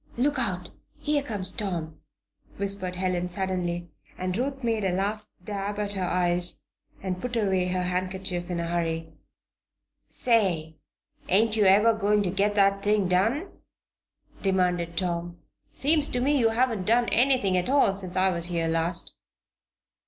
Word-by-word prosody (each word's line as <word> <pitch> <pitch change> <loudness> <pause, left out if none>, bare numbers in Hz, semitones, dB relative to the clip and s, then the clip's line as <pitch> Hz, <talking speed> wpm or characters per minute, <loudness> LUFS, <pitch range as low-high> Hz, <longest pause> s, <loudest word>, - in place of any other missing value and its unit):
"Look 280 +3 +1
out! 180 -7 -1 0.3
here 295 -1 0
comes 205 -9 -3
Tom," 170 -7 -4 0.6
whispered 195 -2 -2
Helen, 180 -1 -1
suddenly, 175 -2 -3 0.3
and 185 0 -2
Ruth 270 +3 -2
made 225 -3 0
a 190 - +1
last 205 +3 -1 0.2
dab 205 0 -3
at 205 -1 -2
her 190 -2 -2
eyes 175 0 +1 0.4
and 185 -1 -3
put 250 -1 -3
away 190 -5 +1
her 180 0 -1
handkerchief 180 0 -2
in 175 -1 -2
a 170 - -2
hurry. 165 -1 -2 0.9
"Say! 180 -10 +1 0.5
ain't 215 +4 +3
you 215 -2 +3
ever 210 +4 +6
going 210 -1 +2
to 180 - 0
get 200 +2 +1
that 200 -1 +3
thing 205 -2 +2
done?" 225 - +1 0.9
demanded 180 -3 0
Tom. 175 -1 -2 0.3
"Seems 300 +1 +2
to 245 - -1
me 280 +4 +2
you 230 -2 +4
haven't 225 -4 0
done 235 +2 +3
anything 245 -6 +3
at 180 +6 0
all 275 -8 +4
since 185 -2 -4
I 190 +1 +3
was 170 -1 -2
here 170 -2 -1
last." 165 +1 0
190 Hz, 150 wpm, -26 LUFS, 180-215 Hz, 0.9 s, ever